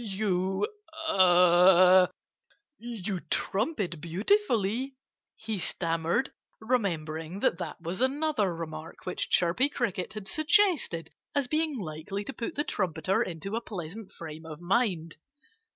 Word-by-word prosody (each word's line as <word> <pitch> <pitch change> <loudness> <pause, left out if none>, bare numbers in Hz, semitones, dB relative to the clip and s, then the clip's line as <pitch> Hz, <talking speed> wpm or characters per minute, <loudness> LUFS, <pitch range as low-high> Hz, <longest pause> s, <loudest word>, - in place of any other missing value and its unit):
"You 195 -2 0 0.4
er 180 0 +6 0.7
you 215 -5 -4
trumpet 200 - -1
beautifully," 230 - +1 0.4
he 220 -2 -4
stammered, 165 +7 -1 0.3
remembering 175 -7 -2
that 170 - +2
that - - -5
was 175 +6 -4
another 265 - +1
remark 160 -1 -8
which 180 - -2
Chirpy 180 +11 +3
Cricket 215 -8 -2
had 210 -2 -7
suggested 310 - +2 0.2
as 280 -3 +1
being 310 0 0
likely 175 +2 -5
to 275 - -6
put 240 +6 -5
the 290 - 0
trumpeter 190 - 0
into 185 +4 -3
a 230 - -1
pleasant 195 -1 -7
frame 160 -1 -9
of 155 -1 -8
mind. 175 -4 0
190 Hz, 120 wpm, -29 LUFS, 170-235 Hz, 0.7 s, er